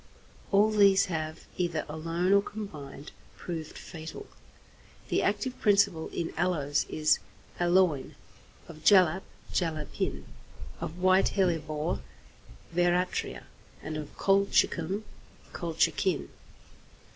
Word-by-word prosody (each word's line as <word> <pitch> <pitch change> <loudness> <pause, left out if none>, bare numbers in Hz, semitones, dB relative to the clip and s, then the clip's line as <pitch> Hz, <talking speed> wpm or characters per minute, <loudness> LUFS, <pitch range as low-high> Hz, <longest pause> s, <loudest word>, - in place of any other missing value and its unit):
All 210 +2 +5
these 200 -2 +5
have, 155 0 -4
either 170 -3 -1
alone 165 +4 0
or 200 - +6
combined, 155 -10 -8 0.3
proved 160 -3 -6
fatal. 160 - -8 0.8
The - - +2
active 210 +5 -1
principle 200 -6 +3
in 165 - -3
aloes 160 -5 +1
is 155 0 +2 0.4
aloin; 175 -5 +2 0.5
of 155 -2 -12
jalap, 185 -3 +6 0.3
jalapin; 155 -4 -2 0.5
of 165 - -5
white 185 +1 +4
hellebore, 155 - 0 0.7
veratria; 175 +1 0 0.4
and 155 +1 -4
of 150 -1 -7
colchicum, 195 -1 +2 0.5
colchicin. 170 +1 0
175 Hz, 95 wpm, -29 LUFS, 155-195 Hz, 0.8 s, or